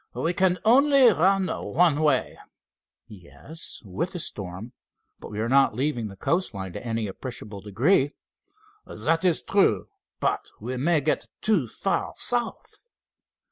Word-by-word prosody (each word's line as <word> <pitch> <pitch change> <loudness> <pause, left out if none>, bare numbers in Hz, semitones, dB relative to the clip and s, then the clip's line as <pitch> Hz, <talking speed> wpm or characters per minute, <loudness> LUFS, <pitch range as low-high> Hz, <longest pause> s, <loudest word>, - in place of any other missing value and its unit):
"We 170 - 0
can 185 0 +2
only 270 +1 +6
run 190 +3 +2
one 165 -5 +1
way." 145 -4 +1 0.7
"Yes, 110 - -8
with 145 - -3
the 175 - -4
storm, 100 - -6 0.5
but - - -10
we 105 - -6
are 110 - 0
not 135 -3 +4
leaving 125 -3 -1
the 100 - -10
coast 165 - -1
line 95 -2 -6
to - - -7
any 115 -2 -2
appreciable 105 -1 -7
degree." 135 - +1 0.7
"That 165 +3 0
is 180 -3 +2
true, 200 0 +2 0.3
but - - -1
we 125 +4 -4
may 155 +4 +2
get 150 +2 -1 0.2
too 200 - +2
far 195 - -2
south." 240 -2 -1
145 Hz, 140 wpm, -25 LUFS, 110-185 Hz, 0.7 s, only